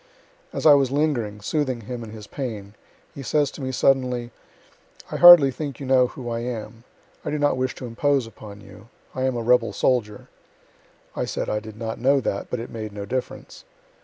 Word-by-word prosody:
As -, -, -5 dB
I 150 Hz, -, +9 dB
was 140 Hz, -2 st, +3 dB
lingering, 130 Hz, -8 st, -1 dB
soothing 130 Hz, -1 st, -1 dB
him 120 Hz, +2 st, -6 dB
in 110 Hz, -, -9 dB
his 105 Hz, -1 st, -10 dB
pain, 105 Hz, -6 st, -6 dB, 0.4 s
he 140 Hz, -, -8 dB
says 145 Hz, +2 st, +1 dB
to -, -, -10 dB
me 130 Hz, 0 st, -3 dB
suddenly, 125 Hz, -2 st, +1 dB, 0.8 s
"I -, -, -2 dB
hardly 175 Hz, -6 st, +9 dB
think 140 Hz, -1 st, -6 dB
you 140 Hz, -, -6 dB
know 130 Hz, -1 st, +4 dB
who 125 Hz, 0 st, -9 dB
I 115 Hz, -1 st, -2 dB
am 115 Hz, -1 st, -6 dB, 0.4 s
I -, -, -3 dB
don't 145 Hz, -2 st, +1 dB
wish 130 Hz, 0 st, -2 dB
to 130 Hz, -, -8 dB
impose 135 Hz, +2 st, 0 dB
upon 105 Hz, -2 st, -12 dB
you 105 Hz, +2 st, -15 dB, 0.3 s
I 130 Hz, -, -2 dB
am 130 Hz, -1 st, 0 dB
a 115 Hz, -, -3 dB
rebel 125 Hz, +2 st, +3 dB
soldier." 110 Hz, -5 st, -1 dB, 0.9 s
I -, -, -1 dB
said -, -, -3 dB
I 105 Hz, -, 0 dB
did 110 Hz, 0 st, -11 dB
not 110 Hz, 0 st, -5 dB
know 135 Hz, +2 st, +4 dB
that, 100 Hz, -6 st, -3 dB
but 125 Hz, -, -3 dB
it 115 Hz, -, -7 dB
made 110 Hz, -2 st, -6 dB
no 100 Hz, -1 st, -6 dB
difference. 130 Hz, +5 st, -6 dB
125 Hz, 195 wpm, -23 LUFS, 110-135 Hz, 0.9 s, I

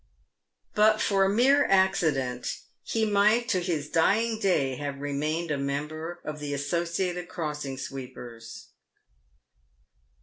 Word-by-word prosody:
But 215 Hz, 0 st, +4 dB
for 195 Hz, -1 st, +2 dB
a -, -, +2 dB
mere 265 Hz, +7 st, +4 dB
accident 155 Hz, -10 st, +1 dB, 0.2 s
he 225 Hz, -1 st, 0 dB
might 210 Hz, +3 st, +3 dB
to 185 Hz, -, +2 dB
his 165 Hz, -5 st, -2 dB
dying 215 Hz, +8 st, +2 dB
day 140 Hz, -, +1 dB
have 140 Hz, -1 st, -4 dB
remained 150 Hz, +4 st, -2 dB
a 145 Hz, -, -1 dB
member 155 Hz, +5 st, -4 dB
of 150 Hz, 0 st, -5 dB
the 145 Hz, -1 st, -3 dB
Associated 175 Hz, +4 st, -2 dB
Crossing 150 Hz, -6 st, -4 dB
Sweepers. 125 Hz, -4 st, -8 dB
160 Hz, 115 wpm, -27 LUFS, 140-195 Hz, 0.2 s, But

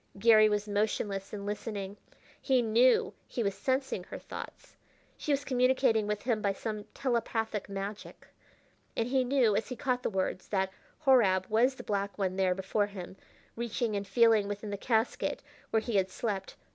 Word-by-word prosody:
Garry 215 Hz, +1 st, +6 dB
was 210 Hz, 0 st, -1 dB
motionless 205 Hz, -1 st, -1 dB
and 200 Hz, -1 st, -6 dB
listening. 205 Hz, -1 st, -4 dB, 0.5 s
He 260 Hz, -3 st, +3 dB
knew 235 Hz, +3 st, +4 dB
he 235 Hz, -, -2 dB
was 200 Hz, -1 st, 0 dB
sensing 260 Hz, -7 st, -1 dB
her -, -, -7 dB
thoughts -, -, -9 dB, 0.4 s
she 300 Hz, -, -3 dB
was 285 Hz, 0 st, +1 dB
communicating 255 Hz, -4 st, +3 dB
with 210 Hz, 0 st, -2 dB
him 235 Hz, -4 st, 0 dB
by 200 Hz, -1 st, +1 dB
some 210 Hz, +1 st, -5 dB
telepathic 225 Hz, -5 st, -1 dB
magic 200 Hz, +1 st, -6 dB, 0.7 s
and 230 Hz, +1 st, 0 dB
he 260 Hz, 0 st, +3 dB
knew, 250 Hz, -5 st, +3 dB
as 205 Hz, -, -1 dB
he 250 Hz, -, -4 dB
caught 250 Hz, -1 st, -1 dB
the -, -, -1 dB
words, 190 Hz, -2 st, -2 dB
that 190 Hz, -2 st, 0 dB, 0.3 s
Horab 200 Hz, -9 st, +5 dB
was 240 Hz, +5 st, +3 dB
the -, -, -9 dB
black 200 Hz, -1 st, -2 dB
one 190 Hz, -2 st, -1 dB
there 190 Hz, -1 st, +2 dB
before 195 Hz, +2 st, 0 dB
him, 190 Hz, -2 st, -8 dB, 0.4 s
reaching 235 Hz, -1 st, -2 dB
and 200 Hz, 0 st, -3 dB
feeling 220 Hz, 0 st, +4 dB
within 205 Hz, +1 st, -5 dB
the -, -, -1 dB
casket 225 Hz, +3 st, 0 dB, 0.3 s
where 220 Hz, -, +2 dB
he 220 Hz, -2 st, -1 dB
had 190 Hz, -1 st, +2 dB
slept. 195 Hz, -1 st, -3 dB
215 Hz, 170 wpm, -30 LUFS, 200-240 Hz, 0.7 s, Garry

